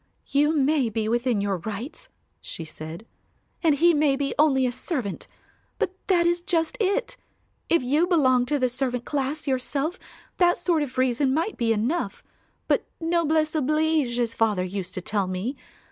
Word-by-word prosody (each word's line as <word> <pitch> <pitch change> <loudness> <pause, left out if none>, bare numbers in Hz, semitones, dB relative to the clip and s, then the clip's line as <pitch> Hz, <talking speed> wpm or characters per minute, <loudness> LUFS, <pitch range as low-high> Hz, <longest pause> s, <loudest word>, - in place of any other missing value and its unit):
"You 295 +3 +2
may 280 -3 +2
be 220 0 -2
within 235 -1 +1
your 200 -2 0
rights," 220 - -6 0.3
she 165 - -7
said, 160 +5 -8 0.6
"and 320 -4 +4
he 340 +4 +5
may 295 -2 +3
be 275 0 -2
only 270 -4 +4
a 250 - +1
servant; 245 - -4 0.5
but - - -1
that 350 -3 +3
is 345 0 +2
just 335 +3 0
it; 460 +5 0 0.5
if 335 -5 +3
you 295 +7 +2
belonged 260 -8 +3
to 295 - +1
the 255 -2 +2
servant 250 -1 -2
class 290 +1 -2
yourself 275 +5 -1 0.4
that 350 -1 +4
sort 335 -4 +1
of 265 -3 -4
reason 260 +1 +2
might 335 +8 -1
be 235 -2 0
enough, 235 +11 -1 0.4
but - - +1
'noblesse 320 -2 +1
oblige' 305 -3 +1
as 235 -2 0
father 210 -5 +1
used 185 0 -4
to 185 - -3
tell 200 +1 -1
me. 185 +9 -3
275 Hz, 165 wpm, -25 LUFS, 235-320 Hz, 0.6 s, he